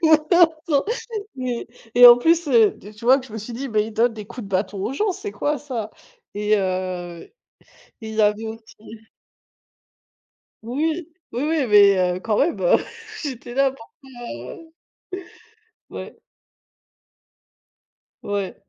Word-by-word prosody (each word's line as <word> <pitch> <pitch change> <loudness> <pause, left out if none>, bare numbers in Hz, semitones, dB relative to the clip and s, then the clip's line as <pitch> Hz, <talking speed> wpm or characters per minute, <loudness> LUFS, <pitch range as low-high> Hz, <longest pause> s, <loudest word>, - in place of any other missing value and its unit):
Non, 320 +2 +5 0.2
non, 285 -3 +2 0.5
mais 250 -2 -3 0.3
et 245 0 +10
en 240 - +11
plus, 330 +4 +2
heu, 225 -5 +5
de 205 - -13
tu 220 +2 -13
vois? 260 +3 +6
Que 260 - -10
je 220 - -15
me 220 - -5
suis 215 +4 -8
dit: 265 +4 -5
«Mais 215 -3 +1
ils 220 - -8
donnent 230 +1 +2
des 210 -2 -8
coups 240 -1 -8
de - - -10
bâton 195 +1 -2
aux 220 +6 -2
gens, 395 +7 0
c'est 400 +2 -7
quoi 290 -1 -1
ça?» 240 -7 -5 0.4
et 210 +1 +1
heu, 185 -3 -3
et - - -18 0.8
il 220 - -7
y 220 - +1
avait 210 +2 +1
aussi 220 0 -11 1.6
Oui, 310 +8 -2 0.2
oui, 245 +4 -3
oui, 310 -3 +1
mais 200 -2 +7 0.2
heu, - - -5
quand 215 +1 -1
même, 330 +5 +1
heu, - - +4 0.5
j'étais 250 -4 -6
là, 270 0 +2
bon, 240 - -11
heu, 325 -1 -12 1.2
ouais. - - -9 2.1
Ouais, 200 -2 -3
235 Hz, 155 wpm, -22 LUFS, 210-285 Hz, 2.1 s, en